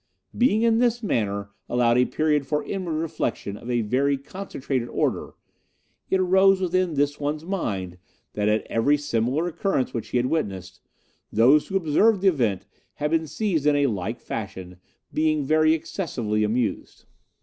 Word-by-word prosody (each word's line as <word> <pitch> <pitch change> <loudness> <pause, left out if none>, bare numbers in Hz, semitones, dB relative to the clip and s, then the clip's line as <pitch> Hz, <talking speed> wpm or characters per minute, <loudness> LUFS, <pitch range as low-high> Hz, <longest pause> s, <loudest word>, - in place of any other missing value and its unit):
Being 230 -3 +3
in 230 -1 +3
this 240 -1 +1
manner 100 - -1 0.2
allowed 120 0 +3
a 125 - +4
period 150 -2 0
for 150 +1 0
inward 185 -4 -4
reflexion 155 -10 -3
of 120 +3 -10
a 120 -1 +1
very 135 +6 +1
concentrated 140 -5 -4
order, - - -2 0.7
it 190 - +2
arose 190 +1 +4
within 185 -2 0
this 145 +1 0
one's 150 +2 -3
mind 95 - -3 0.3
that 105 0 0
at 110 +1 +1
every 140 +6 +2
similar 140 +2 -1
occurrence 170 -6 -1
which 115 -2 -4
he 125 - -1
had 120 - +1
witnessed, 100 - -3 0.5
those 130 +8 +4
who 195 - 0
observed 190 +5 +3
the 195 - +5
event 110 - 0 0.3
had 150 0 -2
been 160 -1 +1
seized 165 -5 -1
in 150 - +4
a 145 0 +3
like 110 -1 -2
fashion, 95 -4 -6 0.4
being 155 -2 +1
very 155 +2 +4
excessively 120 - -2
amused. 115 +2 -2
145 Hz, 160 wpm, -24 LUFS, 115-170 Hz, 0.7 s, the